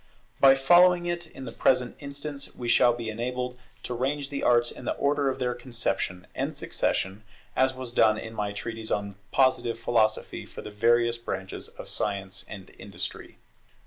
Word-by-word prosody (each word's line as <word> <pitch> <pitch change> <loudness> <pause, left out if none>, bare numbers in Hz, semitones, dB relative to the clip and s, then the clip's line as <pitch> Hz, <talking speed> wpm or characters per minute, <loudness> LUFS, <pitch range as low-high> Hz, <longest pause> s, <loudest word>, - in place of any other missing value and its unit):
By 135 -1 +8
following 175 +6 +6
it 175 -1 -2
in 135 -4 -10
the 115 - -5
present 125 +1 +2
instance, 140 0 -7
we 120 - -5
shall 120 +1 +5
be 120 -1 -4
enabled 125 +2 -3 0.2
to 125 - -3
range 140 +3 -1
the 140 - -3
arts 120 -1 +3
in - - -10
the - - -1
order 140 -1 +1
of 130 - -2
their 125 -2 0
conception 120 -7 -3
and - - -2
succession, 95 +3 -1 0.3
as 130 0 +3
was 130 -2 -4
done 110 -2 +5
in 110 +1 -7
my 105 -2 -2
Treatise 110 +2 -4
on 100 -1 -1 0.2
Positive 130 -3 +3
Philosophy 110 -2 +1
for - - -9
the 105 - -7
various 120 +2 +3
branches 95 -5 -5
of - - -10
Science 100 -2 -3
and 95 -2 -9
Industry. 90 -3 -6
120 Hz, 175 wpm, -27 LUFS, 110-135 Hz, 0.3 s, By